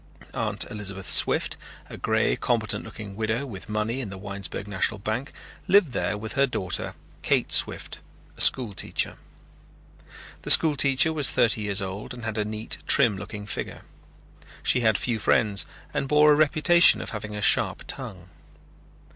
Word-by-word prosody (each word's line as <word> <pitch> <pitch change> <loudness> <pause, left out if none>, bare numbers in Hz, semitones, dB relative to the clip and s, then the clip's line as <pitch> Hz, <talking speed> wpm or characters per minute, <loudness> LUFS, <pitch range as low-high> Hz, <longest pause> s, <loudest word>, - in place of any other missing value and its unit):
Aunt - - -3
Elizabeth 100 -2 -7
Swift, - - +4 0.3
a - - -10
grey - - 0
competent - - -1
looking 100 -2 -10
widow 110 +5 -2
with 105 -8 -10
money 110 +4 -2
in 115 - -6
the 95 - -9
Winesburg 100 0 -7
National 105 +2 -1
Bank, 110 +7 -4 0.4
lived 190 -7 +4
there 105 -4 -2
with 110 +1 -7
her 140 +1 +2
daughter 95 -8 -2 0.3
Kate - - 0
Swift, - - 0 0.4
a - - -2
school 120 -6 +5
teacher. - - -2 1.2
The - - -7
school 155 -3 +6
teacher 140 +3 +2
was 145 -3 +3
thirty 110 -3 +1
years 100 -1 -2
old 100 +6 -7
and 120 -2 -9
had 110 -1 -3
a 105 - -1
neat 110 +1 -5
trim 110 -4 +4
looking 105 +2 -8
figure. 105 - -6 0.8
She 125 - +1
had 110 -4 +2
few 115 -3 -2
friends 105 -2 +1 0.3
and 135 - -2
bore 150 +1 +5
a - - +5
reputation 155 +3 +4
of - - -5
having 105 -1 -6
a 105 - -5
sharp - - +3
tongue. 95 -1 -5
110 Hz, 165 wpm, -25 LUFS, 100-135 Hz, 1.2 s, school